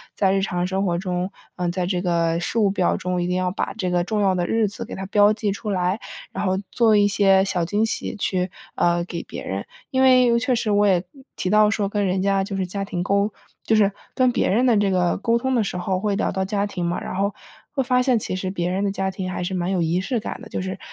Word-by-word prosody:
在 190 -1 +2
日 195 - +2
常 180 -2 -1
生 190 +1 -1
活 170 -2 0
中， 180 0 -2 0.3
呃， 180 -1 -1
在 180 0 -1
这 180 -2 0
个 170 -2 +1
事 175 +6 -3
务 205 -3 +4
表 185 -3 +1
中， 180 0 -2
一 - - -1
定 180 - 0
要 185 0 0
把 190 - -3
这 185 -4 -1
个 175 -1 +2
重 210 +3 -1
要 195 -2 +3
的 175 - 0
日 225 -1 +2
子 205 - -6
给 - - -9
它 190 - -5
标 205 +1 +5
记 210 -1 -1
出 210 +2 -5
来， 185 +2 0 0.3
然 - - -3
后 190 0 +1
做 225 -3 +4
一 205 -1 +5
些 195 -1 +4
小 180 -3 -1
惊 205 +5 0
喜 - - -2
去， 185 -2 -1 0.3
呃， 175 0 +2
给 170 -1 -5
别 - - -8
人， 95 +1 -3 0.3
因 260 -1 +2
为 255 -2 +5
确 255 +2 +1
实 230 -2 -1
我 205 0 +4
也 180 -2 +3 0.3
提 185 - -2
到 215 0 +5
说 205 -1 0
跟 205 0 0
人 185 +1 0
家 195 0 +2
就 195 0 -4
是 190 - 0
家 195 +2 -4
庭 175 -2 -3
沟 200 +3 +1 0.3
就 225 - +2
是 205 -2 +4 0.2
跟 255 -1 +3
别 - - +1
人 230 +7 +3
的 245 -3 +4
这 205 -1 +2
个 180 -2 +1
沟 230 +3 +1
通 260 +2 -1
的 235 -3 +2
时 195 - -3
候 185 +1 -1
会 205 0 0
聊 205 - 0
到 190 0 -1
家 200 +1 0
庭 190 -3 -4
嘛， 170 - -1
然 - - -5
后 200 +2 0 0.4
会 270 - +1
发 250 0 +2
现 250 -1 +3
其 195 -4 -3
实 185 0 -3
别 175 -2 -2
人 190 +2 -1
的 200 - +1
家 195 -1 -2
庭 185 -1 -4
还 180 - -3
是 185 +2 -3
蛮 180 0 -1
有 185 -2 +1
仪 170 +2 +1
式 240 +5 -1
感 - - -6
的， - - -11
就 - - -3
是 185 0 -5
195 Hz, 290 characters per minute, -22 LUFS, 180-210 Hz, 0.4 s, 标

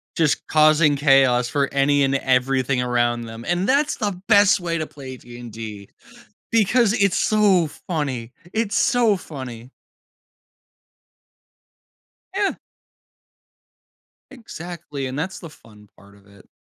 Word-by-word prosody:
just 155 -3 +1
causing 155 -1 +4
chaos 135 -4 +3
for 140 -1 0
any 140 0 +2
and 135 0 +1
everything 130 0 +1
around 120 -1 0
them, 115 +1 -9
and 175 +2 0
that's 285 +3 +1
the 205 -4 -3
best 205 -2 +5
way 170 -1 -2
to 155 -1 -3
play 130 -3 -10
D&D 115 -4 -10 0.6
because 225 0 +3
it's 200 -4 +1
so 200 -6 +3 0.2
funny. 135 -8 -3 0.2
It's 220 -2 -1
so 230 -5 +2
funny. 130 -6 -9 2.6
Yeah. 395 0 0 1.8
Exactly, 170 - -8
and 130 +2 -6
that's 185 +5 -4
the 165 - -10
fun 105 -7 -19
part 100 +1 -19
of 100 0 -23
it. 100 -1 -20
145 Hz, 120 wpm, -21 LUFS, 125-185 Hz, 2.6 s, best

